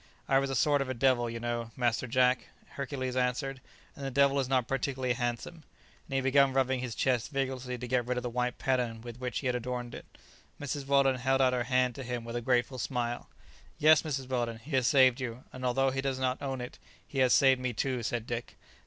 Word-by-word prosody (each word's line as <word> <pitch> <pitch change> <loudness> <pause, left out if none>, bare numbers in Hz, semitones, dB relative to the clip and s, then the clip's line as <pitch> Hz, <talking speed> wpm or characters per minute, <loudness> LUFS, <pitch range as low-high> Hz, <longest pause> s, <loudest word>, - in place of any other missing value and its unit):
"I 135 - +4
was 135 0 -1
a 135 - -2
sort 145 +2 +3
of 135 - -3
a 130 - -2
devil, 120 -1 +2
you 115 0 -5
know, 120 -1 -3
Master 120 0 0
Jack," 125 +1 +2 0.2
Hercules 130 -2 -4
answered; 130 +1 -1 0.3
"and 140 - -9
the 135 - -2
devil 140 +1 +3
is 130 -2 -1
not 130 -3 +2
particularly 130 -1 -1
handsome;" 120 +6 -3 0.5
and 135 - -4
he 135 - +2
began 135 0 +4
rubbing 130 -1 +1
his 125 -3 -4
chest 125 -4 +1
vigorously 130 -3 -3
to 125 - -6
get 120 -1 0
rid 125 0 -1
of 125 - -2
the - - -2
white 125 0 -1
pattern 125 -4 -1
with 120 +1 -9
which 125 -1 -3
he - - -9
had 125 -1 +1
adorned 125 0 -4
it. - - -9 0.5
Mrs. 145 -1 -4
Weldon 140 -2 +4
held 135 +1 +1
out 130 -1 +4
her 125 -1 0
hand 125 0 +2
to 135 - -7
him 120 -1 -4
with 115 0 -6
a 120 - -1
grateful 125 +1 +1
smile. 120 -2 -3 0.5
"Yes, 155 +1 +6
Mrs. 135 -5 -3
Weldon, 120 -3 -1
he 120 +8 -13
has 130 -2 +3
saved 130 -2 +5
you, 125 0 -5
and 130 - -8
although 135 +2 +2
he 135 +1 -2
does 135 -1 -1
not 130 0 -1
own 135 -2 -3
it, 125 - -8 0.3
he 135 - -4
has 130 -1 +4
saved 130 -2 +5
me 125 -1 -1
too," 125 +2 -1
said 115 0 -2
Dick. 120 0 -5
130 Hz, 230 wpm, -30 LUFS, 120-135 Hz, 0.5 s, Yes